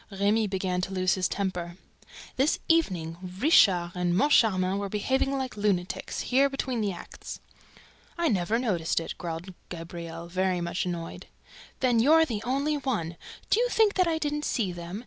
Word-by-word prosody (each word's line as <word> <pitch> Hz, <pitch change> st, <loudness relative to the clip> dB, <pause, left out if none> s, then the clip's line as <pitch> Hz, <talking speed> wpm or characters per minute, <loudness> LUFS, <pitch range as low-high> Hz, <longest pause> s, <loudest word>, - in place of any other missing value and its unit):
Remy 205 Hz, +2 st, +1 dB
began 185 Hz, -2 st, -1 dB
to 190 Hz, -, -3 dB
lose 185 Hz, 0 st, +2 dB
his 185 Hz, -1 st, +1 dB
temper. 180 Hz, -3 st, -3 dB, 0.6 s
"This 270 Hz, +4 st, +2 dB
evening, 180 Hz, -, +1 dB, 0.2 s
Richard 190 Hz, -, +5 dB
and 180 Hz, -1 st, 0 dB
Moncharmin 195 Hz, -6 st, +3 dB
were 200 Hz, -1 st, -3 dB
behaving 265 Hz, +7 st, 0 dB
like 260 Hz, -1 st, -4 dB
lunatics, 200 Hz, -4 st, -1 dB
here, 275 Hz, +2 st, +3 dB
between 260 Hz, -3 st, -2 dB
the 205 Hz, -2 st, 0 dB
acts." 175 Hz, -, -9 dB, 0.8 s
"I 340 Hz, -1 st, +1 dB
never 210 Hz, -, +1 dB
noticed 185 Hz, -12 st, 0 dB
it," 165 Hz, -, -5 dB
growled 170 Hz, +2 st, -5 dB, 0.2 s
Gabriel, 170 Hz, -1 st, -7 dB
very 185 Hz, +1 st, 0 dB
much 175 Hz, +1 st, -2 dB
annoyed. 170 Hz, -2 st, -5 dB, 0.5 s
"Then 245 Hz, -3 st, +3 dB
you're 315 Hz, +7 st, +6 dB
the 225 Hz, -8 st, -3 dB
only 280 Hz, +5 st, 0 dB
one!... 215 Hz, -, -2 dB, 0.4 s
Do -, -, +5 dB
you -, -, +2 dB
think 440 Hz, -3 st, +3 dB
that 365 Hz, -2 st, +2 dB
I 325 Hz, -1 st, +1 dB
didn't 295 Hz, -1 st, -2 dB
see 205 Hz, -6 st, 0 dB
them? 175 Hz, +3 st, -6 dB
200 Hz, 165 wpm, -27 LUFS, 175-265 Hz, 0.8 s, you're